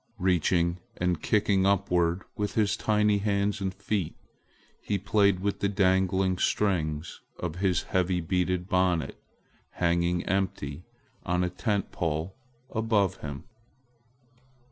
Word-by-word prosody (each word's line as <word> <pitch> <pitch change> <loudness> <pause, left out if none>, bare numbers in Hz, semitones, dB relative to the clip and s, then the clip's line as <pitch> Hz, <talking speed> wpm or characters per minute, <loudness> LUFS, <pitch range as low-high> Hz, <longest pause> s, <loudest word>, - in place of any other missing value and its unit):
Reaching 90 -1 +1 0.2
and 90 -2 0
kicking 100 -2 +2
upward 90 -3 +1
with 105 -1 -3
his 105 -2 +2
tiny 105 -1 +2
hands 100 0 0
and 95 -1 -1
feet, 100 -2 -3 0.7
he 100 - -1
played 100 -1 +2
with 100 0 -1
the 100 - +1
dangling 95 -1 +2
strings 80 -6 0 0.2
of 85 -2 -4
his 90 -2 +1
heavy 90 -1 0
beaded 90 +1 -1
bonnet 90 -4 0 0.5
hanging 85 0 +1
empty 90 -5 -2 0.4
on 90 +1 0
a 90 - -1
tent 100 +1 -1
pole 80 +3 -2 0.4
above 110 -5 +1
him. 70 -2 -7
95 Hz, 120 wpm, -28 LUFS, 90-100 Hz, 0.7 s, kicking